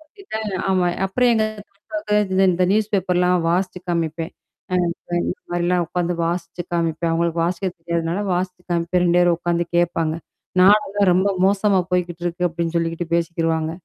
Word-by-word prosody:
பார்த்தீங்கன்னா 220 - -6
ஆமா, 185 -1 +2 0.2
அப்புறம் 245 +6 +2
எங்க 220 - +2 0.2
பெரியப்பவுக்கு 210 +1 -4 0.2
இந்த 190 +1 +3
இந்த 180 +1 +1
நியூஸ்பேப்பர்லாம் 185 -4 +2
வாசிச்சு 180 +1 0
காமிப்பேன். 165 -1 -2 0.4
அப்ப 175 -1 -2
இந்த - - -2 0.2
மாரிலாம் 175 0 +1
உட்காந்து 175 +1 -1
வாசிச்சு 170 +1 -3
காமிப்பேன். 165 -1 0
அவங்களுக்கு 170 0 0
வாசிக்க 180 +2 -1
தெரியாதனால, 170 +2 -2
வாசிச்சு 180 0 -2
காமிப்பேன். 170 +1 +1
2 175 0 +3
பேரும் 175 -1 +4
உட்காந்து 175 0 0
கேப்பாங்க. 165 -2 +1 0.5
"நாடெல்லாம் 200 0 +4
ரொம்ப 190 +3 +3 0.2
மோசமா 195 0 +3
போய்க்கிட்டுருக்கு." 175 0 -1
அப்படின்னு 170 0 -3
சொல்லிகிட்டு 165 0 -1
பேசிக்கிருவாங்க. 165 -1 0
175 Hz, 140 wpm, -21 LUFS, 170-190 Hz, 0.5 s, பேரும்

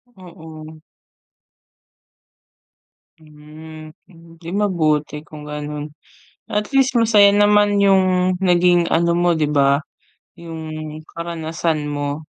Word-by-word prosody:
Oo. 160 -4 -12 2.4
Hmm, 155 0 -13 0.5
di 165 0 -10
mabuti 155 -7 -1
kung 150 -2 -12
ganon, 150 0 -6 0.6
at 210 0 -1
least 270 -1 +3
masaya 210 -3 +5
naman 205 0 +3
yung 185 -2 +2
naging 175 0 +3
ano 170 +1 +2
mo 175 0 +2
'di 155 -3 0
ba? 140 -1 +2 0.6
Yung 155 -2 -8
karanasan 165 -2 -4
mo. 145 0 -4
160 Hz, 90 wpm, -19 LUFS, 155-185 Hz, 2.4 s, masaya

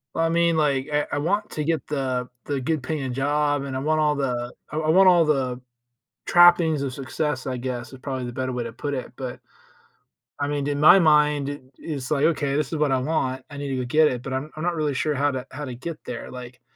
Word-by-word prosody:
Well, 165 - +2
I - - +1
mean, 170 0 +2
like, 140 -2 +1
I 150 0 +1
I - - 0
want 200 +8 0
to 150 - -3
get 160 0 -1
the 130 -4 -2 0.2
the 140 -2 -2
good 150 +2 -1
paying 135 -3 -3
job, 145 +1 +1
and 135 -1 -5
I - - -1
want 155 +3 +1
all 150 -1 +2
the 125 -3 -2 0.2
I 150 - -4
I 155 0 0
want 190 +3 +6
all 175 -2 +6
the 130 -5 0 0.7
trappings 175 -4 +5
of 135 -2 -3
success, 135 +1 -3
I 130 -1 -2
guess, 125 0 -5
i - - -9
probably 130 -1 -4
the 120 - -5
better 130 +1 -3
way 120 -1 -2
to 115 - -6
put 145 +4 -4
it, 130 -2 -4
but 130 -2 -6 1.0
I 145 - 0
meaned, 145 -1 -2
in 145 0 -1
my 165 +5 +8
mind 150 -4 +3
it 145 -1 -7 0.2
is 140 -5 -5
like, 150 -1 +2
"Okay, 145 -3 +1
this 150 0 -1
is 160 - -1
what 150 -1 +2
I 135 - +2
want. 130 -2 -1
I 145 - -8
need 140 0 -4
to 135 - -2
go 125 - -2
get 155 +5 +4
it, 125 -3 -4
but 135 - -6
I'm 135 +4 -3
I'm 155 - -5
not 175 0 0
really 150 -3 -1
sure 150 +3 0
how 145 +1 +1
to 130 -2 -4
how 145 +3 -6
to 125 - -6
get 155 +5 -6
there." 120 - -6
Like, 125 -1 -10
145 Hz, 255 wpm, -24 LUFS, 130-155 Hz, 1.0 s, my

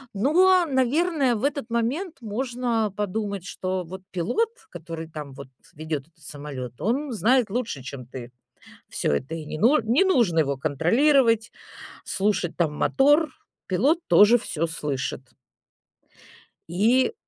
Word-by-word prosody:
но, 355 - +4
наверное, 275 0 +1
в 215 - -5
этот 280 -4 -1
момент 265 +10 -1
можно 235 -1 -2
подумать, 200 -2 -3
что 185 -1 -3
вот 185 +3 -9
пилот, 310 - 0 0.2
который 165 -1 -7
там 150 -3 -8
вот 130 0 -11 0.3
ведет 155 -2 -4
этот 170 - -34
самолет, 140 -5 -8
он 265 +6 -1
знает 230 +1 +2
лучше, 220 - -3
чем 130 -2 -8
ты 125 -1 -9 0.6
всё - - -1
это, 135 - -2
и 160 - -7
не 150 - -6
ну 240 - +4
не 235 - +3
нужно 235 - +3
его 140 -2 0
контролировать, 225 - +2 0.5
слушать 190 -3 -1
там 155 -4 0
мотор. 290 - +3 0.4
Пилот 270 - +2
тоже 205 +7 +7
всё 165 -7 -2
слышит. 135 -5 -4 1.4
И 235 - +2
210 Hz, 130 wpm, -24 LUFS, 160-260 Hz, 1.4 s, тоже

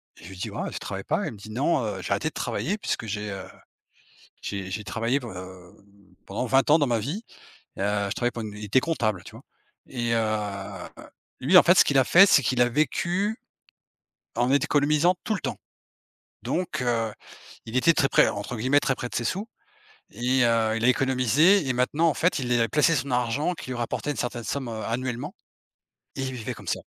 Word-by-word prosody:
Je 85 - -13
lui 95 - -10
dis: - - -4
«Waouh, - - -4
tu - - -5
travailles - - -6
pas?», - - 0
il - - -4
me 105 - -12
dit: 105 +2 -11
«Non, 135 +4 +1
heu, 100 -3 -4
j'ai - - -6
arrêté - - 0
de - - -23
travailler 200 +6 -2
puisque 155 - -3
j'ai, 105 -1 -4
heu, 95 -1 -6 1.0
j'ai 95 -2 -5
j'ai 105 +3 -4
travaillé 115 +5 0
p 125 - -9
heu, 90 -3 -10 0.5
pendant 100 +5 -3
20 135 +3 +3
ans 155 - +7
dans 145 - +2
ma 120 -3 +1
vie 155 - -4 0.5
et - - -8
heu, 100 0 0
je 100 - -3
travaillais 120 0 0
pour 115 - -5
une» 105 -1 -7
il 105 - -7
était 105 +6 +3
comptable 110 - -1
tu - - -11
vois? - - -13 0.4
Et 120 -2 -2
heu - - +2
heu, 105 -3 -3 0.5
lui 165 +8 +4
en - - +9
fait 175 +1 +5
ce - - +8
qu'il 140 -1 +2
a 130 - +5
fait 190 +7 +7
c'est 140 - +5
qu'il 120 0 +2
a 120 - +3
vécu 175 - 0 1.0
en 120 +2 +1
économisant 150 +5 +3
tout 220 - -1
le - - -4
temps. - - -3 0.9
Donc 180 -4 -2
heu, 115 -2 0 0.6
il 115 +3 -5
était 170 +6 +5
très 135 - +2
près - - +4
entre 105 +4 -4
guillemets 130 +6 +3
«très 135 - 0
près 125 - -5
de - - -12
ses 120 - -1
sous» 200 - -2 0.6
et 125 +1 +1
heu, 115 -1 +2
il 115 - -2
a 125 - +5
économisé 135 - +3
et 130 - +1
maintenant 145 +7 +1
en 155 - +1
fait, 180 -2 +1
il 125 -2 -2
est, 120 - +3
heu, - - -2
placé 150 +7 +3
son 135 0 -2
argent 125 +8 0
qui 130 - -9
lui 125 - -3
rapportait 120 +5 -3
une 145 - -3
certaine 120 -1 -3
somme, 135 -3 -3
heu, 110 -1 -5
annuellement 125 +1 -3 0.8
et 135 - -3
il 130 0 -3
vivait 120 -4 -5
comme - - -11
ça. - - -1
125 Hz, 225 wpm, -25 LUFS, 110-145 Hz, 1.0 s, en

